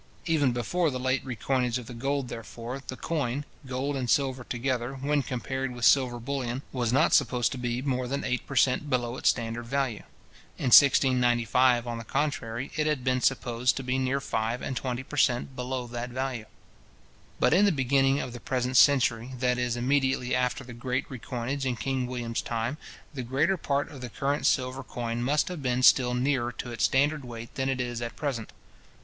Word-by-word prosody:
Even 150 Hz, -6 st, +2 dB
before 155 Hz, +8 st, 0 dB
the 130 Hz, -2 st, -4 dB
late 130 Hz, +1 st, 0 dB
recoinage 125 Hz, 0 st, -1 dB
of 125 Hz, -, -7 dB
the 125 Hz, -, -9 dB
gold, 135 Hz, +2 st, -2 dB
therefore, 120 Hz, +3 st, -7 dB
the 130 Hz, -, -5 dB
coin, 145 Hz, -3 st, -2 dB, 0.2 s
gold 130 Hz, +3 st, -2 dB
and 130 Hz, -3 st, -2 dB
silver 130 Hz, -1 st, +1 dB
together, 125 Hz, +1 st, -2 dB
when 145 Hz, +2 st, 0 dB
compared 130 Hz, 0 st, -3 dB
with 120 Hz, -, -1 dB
silver 125 Hz, -3 st, +4 dB
bullion, 130 Hz, 0 st, -3 dB
was 120 Hz, -3 st, -1 dB
not 130 Hz, -, +3 dB
supposed 125 Hz, -2 st, +3 dB
to 130 Hz, -, -5 dB
be 120 Hz, +1 st, -2 dB
more 130 Hz, -2 st, -1 dB
than 140 Hz, +3 st, -2 dB
eight 125 Hz, -1 st, -2 dB
per 140 Hz, -, -6 dB
cent. 130 Hz, +3 st, +2 dB
below 120 Hz, -2 st, 0 dB
its -, -, +2 dB
standard 115 Hz, 0 st, -2 dB
value, 130 Hz, -4 st, -1 dB, 0.6 s
In 125 Hz, -, -1 dB
1695, 125 Hz, -2 st, +5 dB
on 120 Hz, -1 st, -4 dB
the -, -, -6 dB
contrary, 130 Hz, -2 st, -2 dB
it 155 Hz, -1 st, +1 dB
had 150 Hz, -4 st, 0 dB
been 130 Hz, 0 st, +1 dB
supposed 125 Hz, -1 st, +1 dB
to 135 Hz, -, -3 dB
be 130 Hz, +1 st, 0 dB
near 130 Hz, +1 st, 0 dB
five 115 Hz, -2 st, -2 dB
and 130 Hz, -, -3 dB
twenty 125 Hz, 0 st, -3 dB
per 145 Hz, -, -9 dB
cent. 125 Hz, 0 st, +2 dB
below 125 Hz, 0 st, -3 dB
that 120 Hz, +1 st, -5 dB
value. 125 Hz, -3 st, -3 dB, 0.9 s
But -, -, +4 dB
in 195 Hz, +4 st, +5 dB
the 200 Hz, -, +4 dB
beginning 135 Hz, -1 st, +2 dB
of 125 Hz, -, -6 dB
the 120 Hz, -, -7 dB
present 130 Hz, -2 st, -1 dB
century, 130 Hz, -3 st, +4 dB
that 125 Hz, 0 st, +1 dB
is, 125 Hz, -1 st, -1 dB
immediately 130 Hz, 0 st, +1 dB
after 125 Hz, -1 st, 0 dB
the 120 Hz, -, -10 dB
great 125 Hz, +2 st, -2 dB
recoinage 130 Hz, +2 st, -4 dB
in 125 Hz, -, 0 dB
King 130 Hz, +3 st, -2 dB
William's 120 Hz, -2 st, -3 dB
time, 115 Hz, +5 st, -2 dB, 0.4 s
the 135 Hz, -, -4 dB
greater 140 Hz, +10 st, +1 dB
part 140 Hz, -4 st, -1 dB
of 140 Hz, -4 st, -10 dB
the 125 Hz, -, -5 dB
current 140 Hz, +5 st, 0 dB
silver 130 Hz, 0 st, +1 dB
coin 120 Hz, -2 st, -4 dB
must 140 Hz, +4 st, +1 dB
have 180 Hz, -4 st, -5 dB
been 125 Hz, -1 st, 0 dB
still 125 Hz, -1 st, +5 dB
nearer 125 Hz, -1 st, 0 dB
to 120 Hz, +2 st, -6 dB
its 120 Hz, -, +1 dB
standard 145 Hz, +2 st, +2 dB
weight 115 Hz, -2 st, -8 dB
than 135 Hz, 0 st, -1 dB
it 130 Hz, -1 st, -1 dB
is 120 Hz, -1 st, -3 dB
at 120 Hz, -2 st, -5 dB
present. 125 Hz, -5 st, -3 dB
125 Hz, 195 wpm, -28 LUFS, 120-135 Hz, 0.9 s, 1695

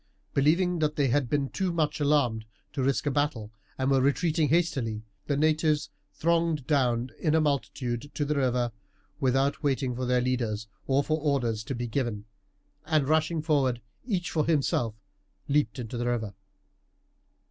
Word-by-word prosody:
Believing 170 Hz, +5 st, +2 dB
that 155 Hz, -1 st, +1 dB
they 140 Hz, -3 st, +2 dB
had 130 Hz, -1 st, +1 dB
been 140 Hz, -1 st, 0 dB
too 190 Hz, -2 st, -1 dB
much 155 Hz, -3 st, 0 dB
alarmed 140 Hz, -7 st, +2 dB, 0.3 s
to 135 Hz, -, -2 dB
risk 135 Hz, +2 st, +1 dB
a 145 Hz, -, +1 dB
battle, 135 Hz, -7 st, -1 dB, 0.3 s
and 130 Hz, +1 st, +1 dB
were 135 Hz, -1 st, +4 dB
retreating 155 Hz, +2 st, +2 dB
hastily, 135 Hz, -10 st, 0 dB, 0.2 s
the 140 Hz, -, +1 dB
natives 155 Hz, -1 st, +2 dB, 0.2 s
thronged 165 Hz, -3 st, +1 dB
down 125 Hz, -4 st, +1 dB
in 155 Hz, -2 st, +2 dB
a -, -, +5 dB
multitude 140 Hz, -3 st, -1 dB
to 145 Hz, -, 0 dB
the 150 Hz, -, 0 dB
river 125 Hz, -3 st, +1 dB, 0.5 s
without 135 Hz, +1 st, +1 dB
waiting 135 Hz, -3 st, 0 dB
for 125 Hz, 0 st, -3 dB
their 125 Hz, 0 st, +3 dB
leaders 120 Hz, -4 st, -1 dB, 0.2 s
or 135 Hz, +1 st, +3 dB
for 155 Hz, +2 st, 0 dB
orders 125 Hz, -7 st, 0 dB
to 135 Hz, -, -3 dB
be 120 Hz, +1 st, -3 dB
given, 115 Hz, -4 st, -2 dB, 0.6 s
and 155 Hz, -4 st, +2 dB
rushing 160 Hz, +1 st, +1 dB
forward, 135 Hz, -6 st, +2 dB, 0.2 s
each 190 Hz, -8 st, -2 dB
for 155 Hz, -2 st, 0 dB
himself, 135 Hz, -8 st, +1 dB, 0.5 s
leaped 145 Hz, 0 st, +1 dB
into 120 Hz, -1 st, -5 dB
the 120 Hz, -, -1 dB
river. 110 Hz, -4 st, -1 dB
140 Hz, 160 wpm, -28 LUFS, 125-155 Hz, 0.6 s, a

